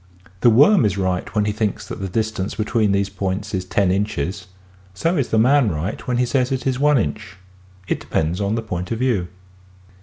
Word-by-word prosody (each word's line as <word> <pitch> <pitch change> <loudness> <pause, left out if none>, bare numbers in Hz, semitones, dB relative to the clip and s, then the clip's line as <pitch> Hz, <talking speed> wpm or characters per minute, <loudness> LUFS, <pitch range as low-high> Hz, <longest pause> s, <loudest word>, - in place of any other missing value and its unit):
The 120 - +5
worm 145 - +6
is 100 -2 +1
right 95 +1 -2
when 105 -1 +2
he 105 - 0
thinks 105 -1 -2
the 95 -1 -5
distance 110 -1 -2
between 110 0 +1
these 100 0 +1
points 100 +2 -4
is 95 -1 -2
lo 100 - +5
inches: 95 -1 -1 0.5
so 165 - 0
is 140 -6 0
the 110 - 0
man 125 +1 +4
right 85 +4 -4
when 125 -1 0
he 125 - +2
says 130 +1 0
it 130 -1 -2
is 130 -1 0
one 150 0 +4
inch. 95 - -3 0.5
It - - -1
depends 80 +5 -1
on 100 +2 0
the 115 - -2
point 90 -3 -5
of 115 - -1
view. 115 -8 0
105 Hz, 205 wpm, -21 LUFS, 95-120 Hz, 0.5 s, worm